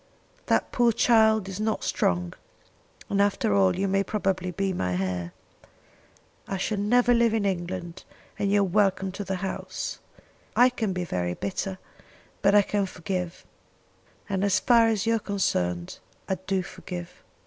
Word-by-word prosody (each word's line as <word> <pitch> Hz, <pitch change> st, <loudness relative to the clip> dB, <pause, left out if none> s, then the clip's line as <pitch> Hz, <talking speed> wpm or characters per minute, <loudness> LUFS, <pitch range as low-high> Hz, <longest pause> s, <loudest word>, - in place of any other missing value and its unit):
That -, -, +1 dB
poor 240 Hz, -1 st, +3 dB
child 220 Hz, -3 st, +4 dB
is 190 Hz, 0 st, -6 dB
not 215 Hz, 0 st, -1 dB
strong, 90 Hz, 0 st, 0 dB, 0.7 s
and 200 Hz, 0 st, +1 dB
after 200 Hz, -, +1 dB
all 95 Hz, -2 st, +3 dB
you 195 Hz, -, 0 dB
may 195 Hz, +1 st, +2 dB
probably 190 Hz, -2 st, -1 dB
be 195 Hz, +2 st, -1 dB
my 90 Hz, -, -1 dB
heir. 90 Hz, -2 st, -2 dB, 1.2 s
I 195 Hz, -, -2 dB
shall 200 Hz, +2 st, -1 dB
never 245 Hz, +4 st, +3 dB
live 235 Hz, -1 st, +3 dB
in 215 Hz, -2 st, 0 dB
England, 180 Hz, -1 st, -3 dB, 0.4 s
and 200 Hz, -1 st, +1 dB
you 205 Hz, 0 st, +4 dB
are -, -, +4 dB
welcome 195 Hz, 0 st, +1 dB
to 205 Hz, +2 st, -5 dB
the 190 Hz, -1 st, -3 dB
house. 190 Hz, -, -5 dB, 0.6 s
I 245 Hz, +1 st, +6 dB
can 225 Hz, -5 st, -2 dB
be 180 Hz, -1 st, -2 dB
very 90 Hz, -, -2 dB
bitter, 190 Hz, 0 st, -3 dB, 0.6 s
but 200 Hz, +1 st, +4 dB
I 205 Hz, -, +7 dB
can 200 Hz, 0 st, -1 dB
forgive; 180 Hz, -1 st, -4 dB, 0.8 s
and 195 Hz, -1 st, -1 dB
as 195 Hz, -2 st, +3 dB
far 235 Hz, -2 st, +5 dB
as 220 Hz, -1 st, 0 dB
you 230 Hz, 0 st, +3 dB
are -, -, -4 dB
concerned 90 Hz, -, -1 dB, 0.3 s
I -, -, 0 dB
do 190 Hz, -1 st, +1 dB
forgive. 180 Hz, -1 st, -8 dB
195 Hz, 160 wpm, -26 LUFS, 180-210 Hz, 1.2 s, I